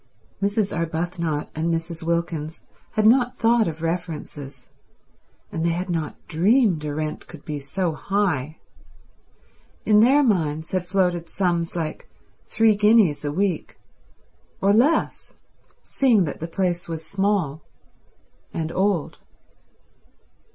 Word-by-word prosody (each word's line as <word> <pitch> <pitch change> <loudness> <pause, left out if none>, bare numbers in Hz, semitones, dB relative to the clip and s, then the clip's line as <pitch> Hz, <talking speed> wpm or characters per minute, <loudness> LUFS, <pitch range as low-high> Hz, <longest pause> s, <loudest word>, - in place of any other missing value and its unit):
Mrs. 200 0 0
Arbuthnot 165 -1 -2
and 160 +2 -1
Mrs. 165 0 -3
Wilkins 165 -2 -2 0.3
had 215 -1 +1
not 245 +2 +4
thought 230 -1 +3
of 160 0 -5
references, 165 -4 -5 0.8
and 160 - -3
they 170 - +2
had 180 +1 -3
not 160 -3 -2
dreamed 190 - +3
a 145 -1 -3
rent 155 0 -4
could 165 -4 -13
be 150 -2 -4
so 170 +6 -2
high. 160 -6 -1 1.3
In 210 -1 +5
their 270 +6 +5
minds 160 - 0
had 185 -1 -1
floated 180 -3 0
sums 175 -3 -1
like 160 -3 -4 0.4
three 225 -1 +4
guineas 210 -8 +4
a 145 - -1
week; 185 0 -1 0.8
or 200 +1 +3
less, 265 +9 +1 0.5
seeing 240 -8 +3
that 150 - -4
the 165 - -4
place 175 0 -2
was 160 -1 -5
small 195 -7 0 0.9
and 160 0 -3
old. 190 -3 0
175 Hz, 125 wpm, -23 LUFS, 160-200 Hz, 1.3 s, In